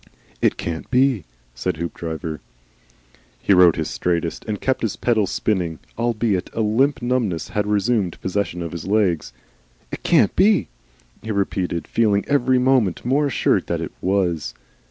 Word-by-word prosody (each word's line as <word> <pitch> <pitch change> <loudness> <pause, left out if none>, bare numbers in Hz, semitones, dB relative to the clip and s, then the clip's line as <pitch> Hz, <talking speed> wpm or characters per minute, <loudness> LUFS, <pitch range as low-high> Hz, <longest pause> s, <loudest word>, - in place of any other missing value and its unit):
"It - - +2
can't 80 -1 -5
be," 130 - +2 0.3
said - - -3
Hoopdriver. 80 -1 -5 1.0
He 100 - +3
rode 90 -3 +6
his - - -2
straightest, 85 -1 -1
and 105 -3 -3
kept 130 0 0
his 110 -4 -1
pedals 110 -5 +1
spinning, 90 -7 -1 0.2
albeit 115 -5 0
a 115 - -1
limp 120 +6 +1
numbness 120 -9 -1
had 105 -2 -1
resumed 105 -2 0
possession 95 -2 -2
of 85 - -5
his 85 0 -6
legs. 95 - +1 0.6
"It - - -6
CAN'T - - +3
be," 200 - +3 0.5
he 110 - -8
repeated, 95 -4 -1
feeling 105 -3 +2
every 130 -2 +3
moment 125 -8 +2
more 140 +4 +2
assured 135 - +1
that - - -1
it - - -5
WAS. 90 -10 0
100 Hz, 150 wpm, -21 LUFS, 85-120 Hz, 1.0 s, rode